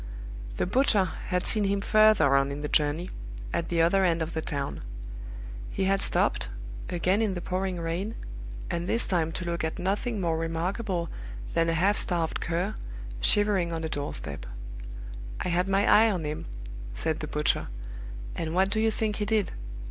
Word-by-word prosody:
The -, -, +2 dB
butcher 210 Hz, -1 st, +4 dB, 0.2 s
had 180 Hz, -1 st, +1 dB
seen 215 Hz, -2 st, +4 dB
him 200 Hz, 0 st, +2 dB
further 215 Hz, -9 st, +5 dB
on 135 Hz, 0 st, +3 dB
in 140 Hz, +1 st, -4 dB
the 150 Hz, -, -1 dB
journey, 150 Hz, +4 st, +2 dB, 0.4 s
at 170 Hz, -, -1 dB
the 165 Hz, -1 st, +3 dB
other 190 Hz, +3 st, +4 dB
end 170 Hz, -2 st, +3 dB
of 160 Hz, -, -5 dB
the 160 Hz, -, -1 dB
town. 140 Hz, -2 st, -3 dB, 0.9 s
He -, -, -1 dB
had 195 Hz, +1 st, +3 dB
stopped -, -, +2 dB, 0.4 s
again 180 Hz, +4 st, +2 dB
in 210 Hz, -4 st, +1 dB
the -, -, -2 dB
pouring 185 Hz, 0 st, -1 dB
rain 170 Hz, +7 st, -2 dB, 0.6 s
and 170 Hz, +1 st, -2 dB
this 235 Hz, -, +2 dB
time 165 Hz, -4 st, +1 dB
to 180 Hz, -, -4 dB
look 170 Hz, -1 st, -1 dB
at 160 Hz, -, -1 dB
nothing 205 Hz, +5 st, 0 dB
more 165 Hz, -3 st, +1 dB
remarkable 170 Hz, +2 st, -1 dB, 0.4 s
than 165 Hz, 0 st, +3 dB
a 165 Hz, -, +2 dB
half 195 Hz, +5 st, +3 dB
starved 170 Hz, -3 st, +1 dB
cur, 175 Hz, +5 st, 0 dB, 0.5 s
shivering 195 Hz, -, +3 dB
on 165 Hz, -1 st, -2 dB
a 160 Hz, -, -1 dB
doorstep. 70 Hz, -, -4 dB, 0.9 s
"I -, -, -1 dB
had 180 Hz, +2 st, +2 dB
my 195 Hz, +1 st, +3 dB
eye 225 Hz, +1 st, +7 dB
on 185 Hz, -6 st, -1 dB
him," 150 Hz, 0 st, -3 dB, 0.5 s
said 160 Hz, -, 0 dB
the 155 Hz, -, -4 dB
butcher; 150 Hz, 0 st, +1 dB, 0.7 s
"and 160 Hz, 0 st, -2 dB
what 190 Hz, +1 st, +3 dB
do 215 Hz, -, +1 dB
you 225 Hz, 0 st, +4 dB
think 215 Hz, -1 st, -1 dB
he 210 Hz, -, 0 dB
did? 215 Hz, -1 st, +1 dB
180 Hz, 180 wpm, -28 LUFS, 165-200 Hz, 0.9 s, eye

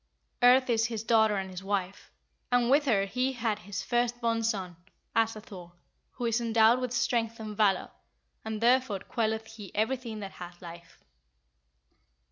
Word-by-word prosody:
Earth 255 Hz, +1 st, +6 dB
is 230 Hz, -2 st, +2 dB
his 225 Hz, -2 st, -4 dB
daughter 220 Hz, -2 st, +3 dB
and 190 Hz, -1 st, -4 dB
his 185 Hz, +1 st, -8 dB
wife, 195 Hz, -1 st, -3 dB, 0.4 s
and 245 Hz, 0 st, +3 dB
with 290 Hz, +2 st, +4 dB
her 205 Hz, -7 st, +2 dB
he 255 Hz, +6 st, -1 dB
had 225 Hz, -4 st, -1 dB
his 195 Hz, 0 st, -6 dB
first 240 Hz, +3 st, 0 dB
born 230 Hz, -1 st, 0 dB
son, 195 Hz, -6 st, -2 dB, 0.4 s
Asa 225 Hz, -1 st, +1 dB
Thor, 180 Hz, -5 st, -11 dB, 0.4 s
who 245 Hz, -, -4 dB
is 230 Hz, 0 st, +1 dB
endowed 230 Hz, +1 st, +4 dB
with 250 Hz, -2 st, -2 dB
strength 235 Hz, -1 st, 0 dB
and 215 Hz, -1 st, -6 dB
valour, 200 Hz, -3 st, +2 dB, 0.5 s
and 220 Hz, -1 st, -4 dB
therefore 240 Hz, -4 st, +2 dB
quelleth 220 Hz, -1 st, -2 dB
he 220 Hz, -3 st, -10 dB
everything 225 Hz, 0 st, -1 dB
that 195 Hz, -1 st, -6 dB
hath 175 Hz, 0 st, -10 dB
life." 170 Hz, -1 st, -12 dB
220 Hz, 160 wpm, -29 LUFS, 200-240 Hz, 0.5 s, Earth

